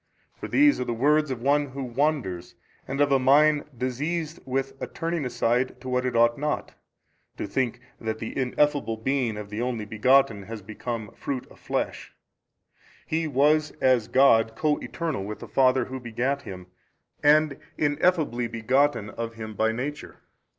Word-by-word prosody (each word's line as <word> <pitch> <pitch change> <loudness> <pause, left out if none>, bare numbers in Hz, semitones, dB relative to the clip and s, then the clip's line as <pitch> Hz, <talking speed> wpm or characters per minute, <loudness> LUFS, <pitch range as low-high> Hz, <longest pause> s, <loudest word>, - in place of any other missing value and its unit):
For - - -7
these 290 +1 +4
are - - 0
the 120 - -2
words 150 +5 +3
of 125 -3 -4
one 145 +1 +3
who 135 0 -6
wanders, 125 - -1 0.3
and 135 +1 -4
of 145 -1 +3
a 135 - +5
mind 145 +3 +4
diseased 150 +7 -2
with 135 +1 -2
a - - -3
turning 165 -3 -3
aside 125 +1 0
to 130 - -10
what 125 0 0
it 125 - -3
ought 120 +2 +4
not, 150 +1 -2 0.6
to - - -3
think 120 +3 -1 0.2
that 110 -1 -3
the 110 0 -6
Ineffable 135 -2 +1
Being 120 -2 -1
of 105 -1 -8
the 105 +2 -3
Only 120 -3 -2
Begotten 115 +1 +3
has 110 +1 -8
become 110 +1 -5
fruit 135 -3 -4
of - - -17
flesh: - - -3 0.9
He 160 0 -1
was 150 +2 +2
as 130 -4 +3
God 115 -4 +4
Co 150 +4 +1
Eternal 160 -12 -3
with 105 +2 -5
the - - -10
Father 130 -2 +3
Who 130 0 -6
begat 125 +4 -2
Him 90 -7 -9 0.6
and 150 -1 +4 0.2
Ineffably 145 -5 +1
begotten 115 0 +1
of 115 0 -5
Him 110 -1 -7
by 110 +1 +1
Nature. 140 +6 -5
130 Hz, 165 wpm, -26 LUFS, 115-145 Hz, 0.9 s, a